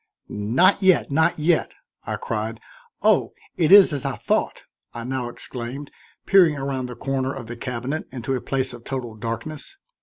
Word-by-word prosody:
"Not 130 - +2
yet, 190 -6 +3
not 160 +3 +2
yet," 160 +2 +1 0.3
I - - -2
cried. 110 +1 -4 0.4
"Oh! - - +3 0.2
it 165 -1 +2
is 195 -5 +9
as 140 - -2
I - - -2
thought," - - -1 0.3
I 120 - -5
now 125 -1 -3
exclaimed, 125 +4 -6 0.3
peering 180 -6 +5
around 135 -2 -3
the 125 - -8
corner 135 0 -2
of 135 -4 -7
the 120 +2 -7
cabinet 125 +5 -4
into 130 +1 -3
a 130 - -2
place 130 -1 -2
of 120 -1 -11
total 125 -4 -5
darkness. 115 - -6
130 Hz, 170 wpm, -23 LUFS, 120-155 Hz, 0.4 s, is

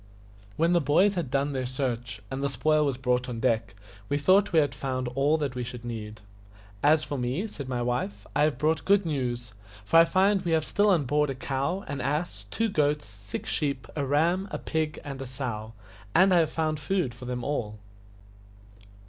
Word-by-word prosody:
When 165 +2 +3
the 175 - +4
boys 180 +8 +4
had 170 -8 -2
done 140 +2 0
their 130 -2 -2
search, 125 -4 -3
and 135 +1 -3
the 140 - 0
spoil 150 +4 +2
was 135 -3 -1
brought 125 -1 0
on 115 -2 -4
deck, 115 -3 0 0.3
we 145 - +1
thought 185 +7 +4
we 165 - +2
had 145 -3 +3
found 130 -2 -3
all 140 +5 +2
that 145 -4 -2
we 125 -1 -3
should 120 0 -7
need. 110 -2 -6 0.6
"As 155 +1 +4
for 145 -3 -4
me," 125 - -1
said 140 -11 -7
my 125 -2 -1
wife, 120 -4 -2
"I 145 - +3
have 150 -4 +2
brought 155 +3 +1
good 200 -1 +3
news, 120 -7 -2 0.3
for 165 - +4
I 165 - +9
find 195 +3 +3
we 170 - 0
have 160 -1 +2
still 205 +1 +2
on 170 -7 +3
board 150 +3 +2
a 135 - -3
cow, 140 +8 -2
an 140 -2 -4
ass, 140 - -2
two 225 - 0
goats, 150 - +1
six 100 -1 -7
sheep, 140 -4 -1
a 145 - -1
ram, 165 +8 +2
a - - -3
pig, 155 -2 -2
and 135 -2 -6
a 135 - -5
sow, 120 -4 -5 0.4
and 190 0 +6
I - - +6
have 160 -2 +3
found 155 -2 -1
food 155 -4 -1
for 120 +1 -10
them 125 -1 -3
all." 110 -7 -2
140 Hz, 210 wpm, -27 LUFS, 125-160 Hz, 0.6 s, I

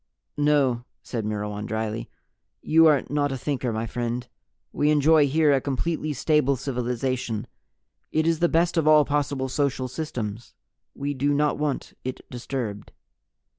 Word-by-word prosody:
"No," 145 -5 +2 0.2
said 115 -4 -4
Myrwan 105 0 -3
dryly. 110 0 -3 0.5
"You 165 +1 +6
are 150 -3 +4
not 145 -1 +1
a 135 - -2
Thinker, 130 -2 -2
my 110 +1 -2
friend. 120 +1 -3 0.5
We 145 - +2
enjoy 150 0 +5
here 150 +1 +3
a 135 - +2
completely 155 +3 -2
stable 145 0 +2
civilization. 125 -3 -2 0.7
It 160 0 +1
is 165 -1 +2
the 175 - +3
best 170 +1 +2
of 160 -2 +2
all 155 -1 +7
possible 140 -2 -1
social 135 -1 -1
systems. 120 -6 -5 0.4
We 140 +1 -2
do 145 +2 +1
not 150 0 +1
want 150 -2 -2
it 130 0 -6
disturbed." 120 -4 -5
135 Hz, 145 wpm, -25 LUFS, 120-150 Hz, 0.7 s, all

